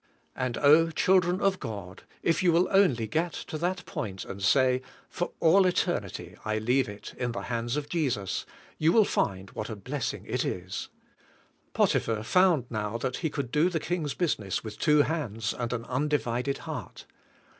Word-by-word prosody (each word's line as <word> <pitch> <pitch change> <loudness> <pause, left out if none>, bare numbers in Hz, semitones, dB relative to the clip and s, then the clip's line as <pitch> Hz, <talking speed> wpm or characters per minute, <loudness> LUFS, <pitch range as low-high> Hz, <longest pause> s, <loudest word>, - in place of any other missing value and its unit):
And 125 -2 -2
oh, 155 +3 +6
children 180 +2 +3
of 195 -1 +2
God, 100 -4 -7 0.2
if 165 - +2
j^ou 180 -2 +4
will 170 +2 +4
onh^ 160 - +3
get 165 +4 0
to - - -6
that 180 +1 -1
point 95 -4 -5
and 100 - -7
say, 130 +5 +3 0.3
"For 175 - -2
all 185 +3 +5
eternity 100 - -1
I 110 0 -1
leave 120 +3 +1
it 105 0 -9
in 120 -1 -1
the - - -4
hands 120 +2 -2
of 145 -1 -3
Jesus," 125 - -1 0.3
you 160 +1 +4
will 215 +2 +5
find 95 - -1
what 110 - -5
a 110 - -4
bless 130 +7 -3
ing - - -10
it - - -1
is. 90 0 -4 0.8
Potiphar 110 -1 +1
found 175 -1 +4
now 110 0 -2
that 125 +1 -2
he 160 - -1
could 140 -5 -4
do 155 +5 +3
the 170 -3 -1
king's 160 -3 -2
business 110 - -1
with 110 -2 -8
two 150 -2 +5
hands 115 -10 -2
and 120 -1 -3
an 115 -1 -3
un 130 +4 -1
divided 135 -2 0
heart. - - -7
130 Hz, 180 wpm, -28 LUFS, 110-165 Hz, 0.8 s, oh